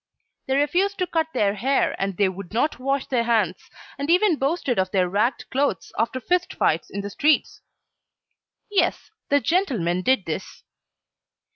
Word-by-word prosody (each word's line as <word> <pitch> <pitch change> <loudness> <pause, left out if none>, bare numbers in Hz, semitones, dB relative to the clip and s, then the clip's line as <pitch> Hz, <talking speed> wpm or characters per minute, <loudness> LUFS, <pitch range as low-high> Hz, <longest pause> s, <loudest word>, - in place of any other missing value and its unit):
They 265 - +1
refused 355 +8 +1
to 365 - 0
cut 325 -2 0
their 205 -7 +1
hair 265 +7 +1
and 195 -2 -2
they 200 - +3
would 190 0 -7
not 275 +3 0
wash 275 +1 -1
their 240 -3 0
hands, 215 -7 0 0.3
and 285 +2 -3
even 360 -1 +4
boasted 275 - 0
of 190 0 +1
their 185 -1 +1
ragged 210 +8 0
clothes 265 -9 -1
after 230 +3 -1
fist 355 +8 -1
fights - - +1
in 200 - -4
the 200 0 -6
streets. 300 +7 +1 1.1
Yes, 415 - 0 0.2
the 285 - +4
gentlemen 245 - 0
did 255 -1 +2
this. 160 - -6
260 Hz, 160 wpm, -23 LUFS, 200-305 Hz, 1.1 s, even